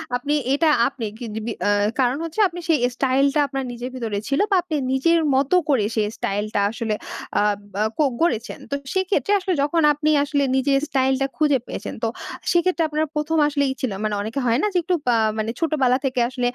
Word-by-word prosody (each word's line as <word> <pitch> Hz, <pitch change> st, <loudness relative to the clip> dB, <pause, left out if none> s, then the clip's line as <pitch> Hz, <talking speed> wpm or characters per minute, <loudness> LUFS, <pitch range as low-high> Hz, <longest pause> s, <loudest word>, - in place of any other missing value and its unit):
আপনি 280 Hz, +4 st, -1 dB, 0.2 s
এটা 315 Hz, +3 st, +3 dB, 0.2 s
আপনি 270 Hz, -4 st, -5 dB
কিগ 230 Hz, -3 st, -6 dB
বি 235 Hz, -, -2 dB, 0.2 s
আ -, -, +3 dB, 0.3 s
কারণ 255 Hz, +1 st, +2 dB
হচ্ছে, 330 Hz, +6 st, -6 dB
আপনি 350 Hz, 0 st, -8 dB
সেই 320 Hz, -3 st, +3 dB, 0.2 s
স্টাইল 270 Hz, +1 st, +2 dB
টা 300 Hz, -, +3 dB
আপনার 270 Hz, 0 st, -3 dB
নিজের 245 Hz, +1 st, -6 dB
ভিতরে 225 Hz, -5 st, -3 dB
ছিল 275 Hz, 0 st, 0 dB
বা -, -, +5 dB
আপনি 335 Hz, -3 st, -4 dB, 0.2 s
নিজের 335 Hz, +6 st, +3 dB, 0.2 s
মতো 275 Hz, +6 st, +2 dB
করে 255 Hz, -8 st, +3 dB
সেই 215 Hz, -1 st, +1 dB
স্টাইল 205 Hz, +2 st, -1 dB
টা 205 Hz, -, +3 dB
আসলে 225 Hz, -2 st, -2 dB, 0.5 s
আব 205 Hz, -1 st, +1 dB, 0.2 s
আ -, -, +4 dB
কো 305 Hz, -, +3 dB, 0.2 s
গড়েছেন। 240 Hz, -9 st, 0 dB
তো -, -, +1 dB, 0.2 s
সেক্ষেত্রে 380 Hz, +2 st, 0 dB
আসলে 370 Hz, -1 st, -1 dB
যখন 310 Hz, +4 st, +1 dB
আপনি 300 Hz, +1 st, -1 dB
আসলে 285 Hz, -1 st, 0 dB
নিজের 275 Hz, +1 st, +2 dB
স্টাইল 265 Hz, -1 st, +2 dB
টা 270 Hz, -, +2 dB
খুঁজে 290 Hz, -4 st, +3 dB
পেয়েছেন -, -, -6 dB
তো, -, -, +2 dB, 0.4 s
সেক্ষেত্রে 345 Hz, 0 st, +2 dB
আপনার 305 Hz, +1 st, 0 dB
১ম 310 Hz, +2 st, 0 dB
আসলে 285 Hz, -1 st, 0 dB
ই -, -, -2 dB
ছিল 255 Hz, -, -1 dB
মানে 215 Hz, -1 st, 0 dB
অনেকে 220 Hz, +6 st, -3 dB
হয় 235 Hz, +3 st, +2 dB
না? 420 Hz, -, +2 dB
যে, -, -, +2 dB
একটু 355 Hz, +2 st, +1 dB, 0.2 s
আ -, -, +3 dB, 0.2 s
মানে 220 Hz, +1 st, -1 dB
ছোটবেলা 275 Hz, -6 st, +2 dB
থেকে 255 Hz, -1 st, -2 dB
আসলে 255 Hz, -1 st, -7 dB
275 Hz, 210 wpm, -22 LUFS, 245-315 Hz, 0.5 s, বা